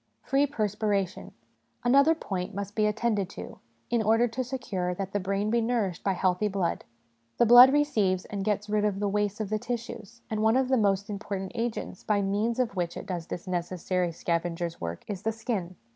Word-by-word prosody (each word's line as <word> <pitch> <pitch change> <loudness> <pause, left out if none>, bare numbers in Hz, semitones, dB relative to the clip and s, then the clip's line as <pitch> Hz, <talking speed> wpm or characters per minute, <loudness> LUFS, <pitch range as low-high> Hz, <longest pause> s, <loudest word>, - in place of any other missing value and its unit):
Free 280 +1 +2
Perspiration. 210 -6 -1 0.5
Another 280 +6 +5
point 185 - -4
must 200 0 -4
be 215 -1 +2
at 210 0 -1
tended 210 -5 0
to, - - -8 0.3
in 235 -1 +3
order 225 +3 +3
to 255 +3 -2
secure 205 -8 -3
that 195 +1 -4
the 205 - +1
brain 200 +2 -1
be 235 0 +3
nourished 225 -7 -1
by 195 - +2
healthy 185 +2 +1
blood. 190 -4 -1 0.5
The 240 - +5
blood 245 +3 +10
receives 215 -11 +2
and 200 -2 -4
gets 210 0 -1
rid 210 0 +1
of 205 -2 0
the 205 - 0
waste 205 +1 0
of 215 -2 -3
the 215 - +1
tissues, 235 -1 -6
and 215 -1 -2
one 220 +3 +4
of 260 -1 +1
the 265 - +4
most 200 -3 +2
important 195 -2 -4
agents 230 -5 -4
by 205 -2 +1
means 210 +4 0
of 245 -5 0
which 175 -2 -2
it - - -6
does 180 -4 -4
this 175 - -6
necessary 180 0 -1
scavenger's 170 0 -2
work 85 0 -5
is 195 -3 -4
the 225 +1 0
skin. 215 -5 -3
205 Hz, 200 wpm, -28 LUFS, 190-230 Hz, 0.5 s, blood